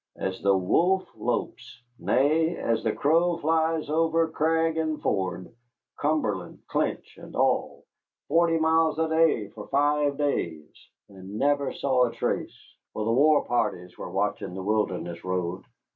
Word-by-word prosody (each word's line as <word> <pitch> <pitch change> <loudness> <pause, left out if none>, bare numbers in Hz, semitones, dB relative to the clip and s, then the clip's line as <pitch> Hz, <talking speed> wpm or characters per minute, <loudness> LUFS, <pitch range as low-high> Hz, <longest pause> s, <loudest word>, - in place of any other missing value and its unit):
As 95 -1 -4
the 100 -1 +3
wolf 180 - +2
lopes, 110 - -3 0.2
nay, 160 +5 +2
as 115 -1 -1
the 110 - +1
crow 165 +6 +2
flies 160 0 0
over 165 +1 +2
crag 160 +1 +1
and 155 -1 -1
ford, 95 0 -2 0.5
Cumberland, 145 -10 -1
Clinch, - - -3
and - - -11
all, - - 0 0.4
forty 165 +1 +3
miles 160 -1 +2
a 160 0 +1
day 160 -10 +2
for 105 0 -10
five 145 0 +1
days, 85 - -2 0.4
and 95 +1 -10
never 140 +1 +1
saw 130 -2 +2
a 120 - -3
trace - - -4 0.2
for 110 - -3
the 115 - +1
war 150 +4 +4
parties 90 -7 -1
were - - -7
watching 90 - -2
the 95 - -5
Wilderness 95 -5 -2
Road." 90 0 -3
145 Hz, 145 wpm, -26 LUFS, 100-160 Hz, 0.5 s, war